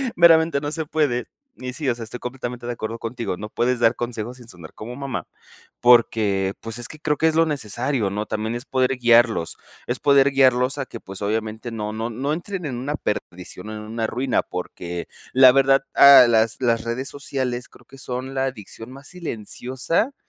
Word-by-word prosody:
Meramente, 165 -3 +5
no 145 0 -3
se 160 -2 -4
puede. 140 -7 0 0.3
Y 125 0 -5
sí, 145 -1 -4
o - - +2
sea, 115 - -7
estoy 115 +2 -7
completamente 125 -1 -6
de 120 - -2
acuerdo 115 0 -5
contigo, 115 -3 -4
no 105 +1 -7
puedes 125 +2 0
dar 115 0 +4
consejos 120 0 -5
sin 120 -2 -15
sonar 85 -6 -12
como 120 +3 -8
mamá 135 -3 -5 0.5
porque, 105 -5 +4
pues, 115 +1 -6
es 120 - -3
que 155 - -11
creo 150 -1 0
que 160 - +3
es 160 - +1
lo 165 0 +4
necesario, 125 -3 -1
¿no? 105 +1 -3
También 110 +2 -3
es 120 +2 -6
poder 130 -1 0
guiarlos, 120 -7 +3 0.3
es 120 +1 -2
poder 140 -1 +4
guiarlos 130 0 +3
a 135 - -2
que, 115 - -8
pues, 95 -1 -10
obviamente 110 +2 -2
no 105 -1 -4
no 115 +2 -3
no 135 +6 -2
entren 180 +2 -5
en 130 -5 -4
una 145 +4 -3
perdición 90 -4 -5
o 110 - -6
en 105 - -7
una 110 +1 -3
ruina 125 +1 0
porque 90 -1 -6 0.3
la 130 0 +8
verdad 135 +1 +4
a 140 -2 +9
las 110 0 +2
las 115 -2 +1
redes 120 +3 -3
sociales 130 -3 -4
creo - - -20
que 135 - -15
son 130 +1 -5
la 135 0 +1
adicción 115 -1 -7
más 135 +2 -12
silenciosa 160 - -3
125 Hz, 200 wpm, -22 LUFS, 110-135 Hz, 0.5 s, a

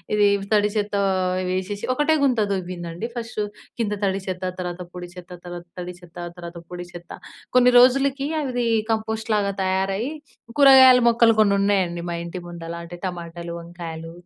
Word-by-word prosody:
ఇది 205 -1 +5 0.3
తడి 210 0 +4
చెత్త 205 -1 -1 0.5
వేసేసి 190 +2 -3
ఒకటే 295 +4 +2
గుంత 255 -4 +2
తొవ్విందండి 175 0 -4
ఫస్ట్ 230 -2 -4 0.4
కింద 210 -3 0
తడి 195 0 0
చెత్త, 185 0 -4 0.2
తర్వాత 180 0 -4
పొడి 180 -1 -7
చెత్త 180 0 -11
తర్వాత 175 0 -7
తడి 180 0 -6
చెత్త 175 -1 -16 0.2
తర్వాత 170 0 -8
పొడి 175 0 -6
చెత్త. 175 0 -11 0.5
కొన్ని 250 0 +6
రోజులకి 270 +2 +4 0.2
అవి 245 -4 -1 0.2
కంపోస్ట్‌ 220 0 -2
లాగా 200 -1 +1
తయారయ్యి 195 +6 0 0.5
కూరగాయల 265 -2 +8
మొక్కలు 230 -1 +5
కొన్ని 205 -2 +5
ఉన్నాయండి 190 -4 +1
మా - - -2
ఇంటి 170 +2 -6
ముందల 170 -1 -7
అంటే 170 +1 -9
టమాటాలు, 170 -1 -6
వంకాయలు, 165 -1 -8
190 Hz, 150 wpm, -23 LUFS, 175-230 Hz, 0.5 s, కూరగాయల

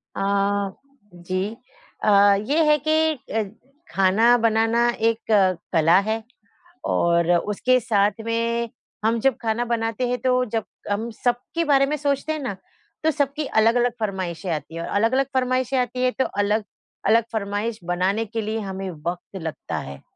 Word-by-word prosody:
अ, 200 0 0 0.4
जी 185 +5 -3 0.5
अ, - - +3 0.3
ये 285 +11 +1
है 300 0 +5
कि 315 0 +3 0.2
अ, 225 0 +1 0.5
खाना 205 +6 +4
बनाना 225 +1 +2
एक 225 -1 -1
अ, 190 -3 +5 0.2
कला 165 +2 +5
है 220 0 -1 0.6
और 170 0 +2
उसके 250 +7 +1
साथ 205 -1 +1
में 230 0 -1 0.3
हम 225 +1 +2
जब 270 -1 +2
खाना 230 +1 0
बनाते 230 +1 -1
है 250 - 0
तो 255 0 +1
जब 225 -2 -2 0.2
कम 220 +3 -2
सबके 245 +7 0
बारे 275 -3 +4
में 300 +2 -1
सोचते 285 +1 -1
हैं 310 - -4
ना, 205 -9 -4 0.5
तो 320 - +4
सबकी 290 0 -1
अलग-अलग 235 +1 +3
फ़रमाइशें 185 -4 -3
आती 155 +1 -5
हैं, 165 - -4
और - - -5
अलग-अलग 230 +6 +2
फ़रमाइशें 255 0 +1
आती 250 0 -1
है 255 - +4
तो 265 - +3
अलग-अलग 210 +1 -1
फ़रमाइश 210 +1 -2
बनाने 185 +5 0
के 225 +2 -3
लिए 215 +1 -2
हमें 195 -2 -5
वक़्त 175 +4 -6
लगता 160 -1 -4
है। 70 0 -8
225 Hz, 155 wpm, -23 LUFS, 195-250 Hz, 0.6 s, है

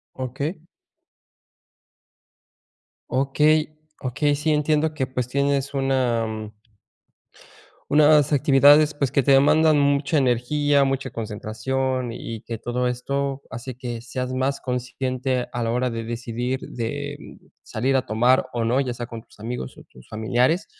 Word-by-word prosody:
Okey. 140 +6 -4 2.5
Okey, 150 +4 +2 0.2
okey. 145 +3 0
Sí, 150 +2 -1
entiendo 155 +1 +1
que 135 -4 -1
pues 125 -1 -3
tienes 140 +1 0
una, 130 -4 +1
mm 110 -1 -6 1.4
unas 150 0 +5
actividades, 145 +2 +5
pues 140 -4 -1
que 140 - +3
te 140 - +3
demandan 155 +3 +5
mucha 140 +1 +2
energía, 140 +2 +2
mucha 135 -1 -2
concentración, 115 +3 -3
y 115 -1 -6
que 115 - -5
todo 125 +3 -2
esto 140 +2 -2
hace 120 +1 -7
que 120 -2 -5
seas 125 +1 -4
más 130 +2 -1
consciente 125 0 -2
a 120 - -3
la 115 - 0
hora 125 +2 0
de 115 -1 -4
decidir, 120 +2 -3
de 115 -2 -4 0.4
salir 135 +2 -1
a 130 - 0
tomar 120 +4 +3
o 115 -1 0
no, 125 +4 +2
ya 125 -3 -2
sea 120 0 -5
con 115 -2 -8
tus - - -23
amigos 110 - -6
o - - -13
tus 65 - -18
familiares. 125 - +1
130 Hz, 140 wpm, -23 LUFS, 120-140 Hz, 2.5 s, unas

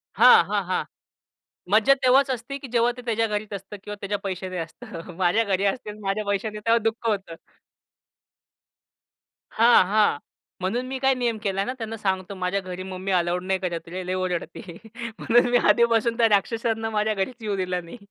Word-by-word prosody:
हां, - - +8
हां, - - -1
हां. - - -1 0.9
मज्जा 220 +6 +6
तेव्हाच 265 +2 +5
असते, 255 +3 -4
की 270 - -9
जेव्हा 235 +1 +4
ते - - -7
त्याच्या 225 -1 +1
घरीच 210 0 -4
असतं 195 +1 -7
किंवा 205 0 -6
त्याच्या 205 0 -2
पैशाने 185 -1 -4
असतं. 165 +1 -8
माझ्या 185 +5 +3
घरी 195 -1 0
असतील, 210 +1 -2
माझ्या 195 +2 -1
पैशाने 210 +1 -2
तेव्हा 230 +2 +3
दुःख 225 +1 -1
होतं. 195 -6 -2 2.2
हां, 230 -4 +5
हां. 210 -7 +2 0.4
म्हणून 235 +7 -1
मी 265 - -4
काय 270 0 +3
नियम 240 -3 -1
केला 195 -1 0
ना 255 - -3
त्यांना 225 -1 -5
सांगतो, 190 -1 -2
"माझ्या 185 +1 -1
घरी 185 0 -7
मम्मी 190 +1 -5
अलाऊड 175 0 +1
नाही 190 0 0
करत 175 -2 -4
रे, 185 +1 -5
लय 185 - -1
ओरडते." 180 -1 -3 0.6
म्हणून 240 +2 +4
मी 245 - +5
आधीपासून 235 0 +3
त्या 230 -1 +4
राक्षसांना 225 +2 0
माझ्या 215 0 0
घरीच 200 +5 -2
येऊ 210 -2 -2
दिला 180 -1 -2
नाही. 170 +7 -11
205 Hz, 175 wpm, -24 LUFS, 185-230 Hz, 2.2 s, हां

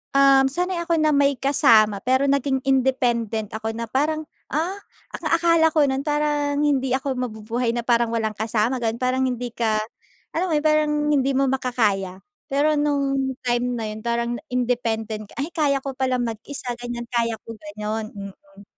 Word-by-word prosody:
um 275 -1 +6
sanay 360 +5 -2
ako 335 0 0
na 310 0 +3
may 280 -1 +3
kasama. 220 -7 +4
Pero 260 +2 +2
naging 275 -1 +1
independent 240 -5 +1
ako 220 0 -3
na 230 - -4
parang, 310 +4 0 0.3
ah, 350 +7 -1 0.4
ang 335 - -9
akala 335 -1 +4
ko 300 - +5
nun 265 +1 -1
parang 295 -1 0
hindi 270 -3 +1
ako 265 0 -2
mabubuhay 230 0 -2
na 240 - -2
parang 235 -1 +2
walang 220 -1 0
kasama, 225 +4 0
ganon. 230 0 -2
Parang 255 +1 +1
hindi 245 -1 -3
ka 220 -2 +1 0.6
alam 345 +1 0
mo - - +1
yun, 300 - -8
parang, 305 0 +3 0.2
hindi 270 0 +2
mo 270 +1 +2
makakaya. 215 -8 0 0.3
Pero 300 +2 +2
nung 275 -2 0
time 245 0 0
na 225 -2 -3
yun, 215 0 -8
parang 235 0 -1 0.2
independent, 225 -4 -2
"Ay! 280 - -1
Kaya 285 -4 +1
ko 275 -2 -5
pala 260 -1 0
mag-isa," 240 +2 -4
ganyan. 240 -1 -5
"Kaya 230 -2 0
ko," 230 - -8
ganon. 215 +1 -5
Mm. 200 0 -11
255 Hz, 170 wpm, -23 LUFS, 225-280 Hz, 0.6 s, um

